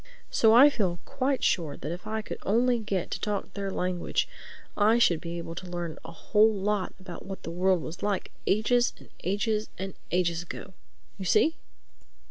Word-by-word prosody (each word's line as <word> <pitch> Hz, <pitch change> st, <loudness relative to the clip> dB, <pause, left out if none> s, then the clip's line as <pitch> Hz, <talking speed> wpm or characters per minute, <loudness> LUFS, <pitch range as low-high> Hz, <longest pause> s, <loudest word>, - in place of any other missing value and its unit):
So 220 Hz, -, +5 dB
I 280 Hz, +4 st, +9 dB
feel 185 Hz, -9 st, 0 dB
quite 275 Hz, 0 st, -1 dB
sure 160 Hz, -6 st, +1 dB
that 150 Hz, -, -5 dB
if 180 Hz, +4 st, -6 dB
I 220 Hz, 0 st, -2 dB
could -, -, -6 dB
only 240 Hz, +4 st, +2 dB
get 200 Hz, -5 st, -2 dB
to -, -, -2 dB
talk 200 Hz, -2 st, -3 dB
their 200 Hz, -1 st, -3 dB
language, 180 Hz, -2 st, -1 dB, 0.5 s
I 220 Hz, +3 st, +4 dB
should 175 Hz, -9 st, +4 dB
be 170 Hz, 0 st, -5 dB
able 165 Hz, -1 st, -5 dB
to 180 Hz, +2 st, -7 dB
learn 175 Hz, -2 st, -4 dB
a 165 Hz, -, -8 dB
whole 210 Hz, +6 st, +3 dB
lot 205 Hz, -1 st, -1 dB
about 185 Hz, -2 st, -9 dB
what 195 Hz, -1 st, -7 dB
the 165 Hz, -, -5 dB
world 180 Hz, 0 st, +2 dB
was 160 Hz, +2 st, -7 dB
like 205 Hz, -2 st, -1 dB, 0.2 s
ages 240 Hz, +4 st, +3 dB
and -, -, -16 dB
ages 210 Hz, +3 st, 0 dB
and 190 Hz, 0 st, -4 dB, 0.2 s
ages 170 Hz, -2 st, +1 dB
ago. 175 Hz, +2 st, -8 dB, 0.5 s
You 190 Hz, -, -4 dB
see?" 320 Hz, -, +4 dB
195 Hz, 185 wpm, -28 LUFS, 175-220 Hz, 0.5 s, I